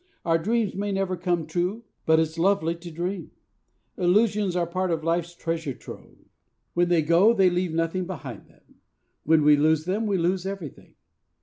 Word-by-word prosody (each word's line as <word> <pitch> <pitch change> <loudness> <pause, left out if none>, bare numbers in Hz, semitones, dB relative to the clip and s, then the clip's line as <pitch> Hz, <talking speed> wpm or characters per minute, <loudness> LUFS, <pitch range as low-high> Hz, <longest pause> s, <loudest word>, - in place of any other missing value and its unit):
Our 165 -1 +2
dreams 220 +4 0
may 205 +2 -3
never 195 -1 -1
come 175 -2 -1
true; 180 +8 -2 0.2
but 160 0 +5
it's 160 +1 -1
lovely 175 -2 +2
to 170 +1 -10
dream! 175 +4 -4 0.7
Illusions 200 +1 +2
are 175 -1 +1
part 185 +2 -2
of 165 -2 -1
life's 170 +1 -1
treasure 165 -6 -3
trove. - - -12 0.6
When 175 0 +2
they 170 -3 +3
go, 170 +8 +5
they 190 -5 +4
leave 175 -1 -1
nothing 165 +2 -1
behind 185 -5 -8
them. - - -27 0.4
When 160 0 +4
we 150 0 +6
lose 155 +1 +2
them, 205 +5 -1
we 200 -2 +1
lose 180 +2 0
everything. 195 -8 -8
175 Hz, 175 wpm, -25 LUFS, 165-190 Hz, 0.7 s, we